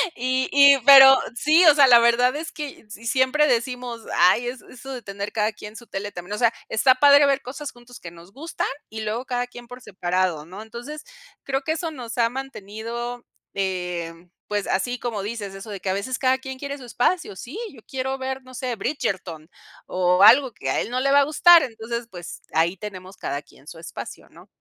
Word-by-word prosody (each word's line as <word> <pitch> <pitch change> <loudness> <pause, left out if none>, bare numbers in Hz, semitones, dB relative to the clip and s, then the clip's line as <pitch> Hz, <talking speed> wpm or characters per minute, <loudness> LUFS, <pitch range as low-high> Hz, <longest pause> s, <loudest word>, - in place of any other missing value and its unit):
y 255 +1 -1
y 280 -1 +7
pero 270 -1 +10 0.2
sí, 310 +7 +4
o 305 -3 +7
sea, 285 -2 +7
la 240 -2 +7
verdad 245 +3 +3
es 320 +2 -5
que 290 -7 -8
si 210 +2 -11
siempre 260 +5 +2
decimos: 245 -2 -2 0.2
"Ay 235 +7 +4
es 250 +1 -6
eso 270 +2 -11
de 250 -3 -7
tener 200 0 -6
cada 215 0 0
quien 210 +1 -11
su 235 +1 -11
tele", 205 0 -6
también, 180 +3 -8
o - - -3
sea, 235 -2 +3 0.2
está 255 +4 +3
padre 285 +1 +6
ver 275 0 0
cosas 280 +3 -7
juntos 240 0 -15
que 170 - -9
nos 170 +3 -16
gustan, 320 +5 -4 0.2
y 220 0 -7
luego 220 +4 -3
cada 245 -1 -2
quien 245 -1 -13
por 250 +1 -11
separado, 180 -5 -2
¿no? 195 +4 -9
Entonces, 240 +7 -9 0.4
creo 270 0 -2
que 315 +3 -1
eso 325 0 -4
nos 245 -6 -8
ha 235 -1 +3
mantenido, 240 -1 -7 0.3
eh, 180 -3 -3 0.4
pues, 205 -1 -2
así 245 +7 -1
como 230 -4 -4
dices, 205 -1 -6
eso 195 +2 -10
de 200 - -6
que 190 - -4
a - - 0
veces 255 +7 -3
cada 260 0 +1
quien 265 0 -8
quiere 280 +1 -6
su 255 - -11
espacio. 245 - -1
Sí, 265 - -8
yo 235 -5 -16
quiero 265 0 -3
ver, 265 0 -5
no 255 - -15
sé, 250 -1 -3
Bridgerton, 185 - -4 0.4
o 180 +1 +2
algo 250 +3 +6
que - - -5
a - - 0
él - - -5
no 250 +1 -2
le 275 +1 +1
va 285 - +6
a - - +5
gustar. 330 +3 +6
Entonces, 235 -1 -5
pues, 175 -2 -9
ahí 170 +4 +1
tenemos 190 -1 -9
cada 140 - -4
quien 140 - -22
su 165 - -10
espacio, 165 - -9
¿no? - - -18
240 Hz, 215 wpm, -23 LUFS, 200-265 Hz, 0.4 s, pero